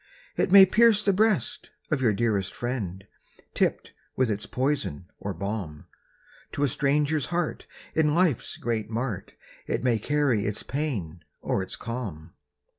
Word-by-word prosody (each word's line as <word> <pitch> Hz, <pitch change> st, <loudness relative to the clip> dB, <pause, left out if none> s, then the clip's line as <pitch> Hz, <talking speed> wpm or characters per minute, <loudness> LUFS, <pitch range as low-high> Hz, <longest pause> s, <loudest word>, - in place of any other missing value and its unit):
It -, -, 0 dB
may 195 Hz, 0 st, +10 dB
pierce 215 Hz, +1 st, +4 dB
the 200 Hz, -, +4 dB
breast 215 Hz, 0 st, +1 dB, 0.2 s
of 145 Hz, -3 st, +1 dB
your 120 Hz, -4 st, +4 dB
dearest 105 Hz, -3 st, 0 dB
friend, 100 Hz, -7 st, -4 dB, 0.5 s
Tipped -, -, 0 dB, 0.2 s
with 130 Hz, -4 st, +2 dB
its 105 Hz, 0 st, -4 dB
poison 130 Hz, -, -1 dB
or 100 Hz, -, -4 dB
balm; 95 Hz, -5 st, -5 dB, 0.7 s
To 145 Hz, -, -1 dB
a -, -, +4 dB
stranger's 145 Hz, +3 st, +1 dB
heart 175 Hz, -1 st, -2 dB, 0.3 s
in 150 Hz, -1 st, +2 dB
life's 170 Hz, -8 st, +1 dB
great 110 Hz, -3 st, -2 dB
mart, 115 Hz, -3 st, -4 dB, 0.3 s
It -, -, -1 dB
may 120 Hz, -3 st, +2 dB
carry 135 Hz, -4 st, +1 dB
its 105 Hz, 0 st, -2 dB
pain 105 Hz, -, -3 dB, 0.2 s
or -, -, -1 dB
its 95 Hz, -, -6 dB
calm. 100 Hz, -10 st, -6 dB
125 Hz, 145 wpm, -26 LUFS, 100-150 Hz, 0.7 s, may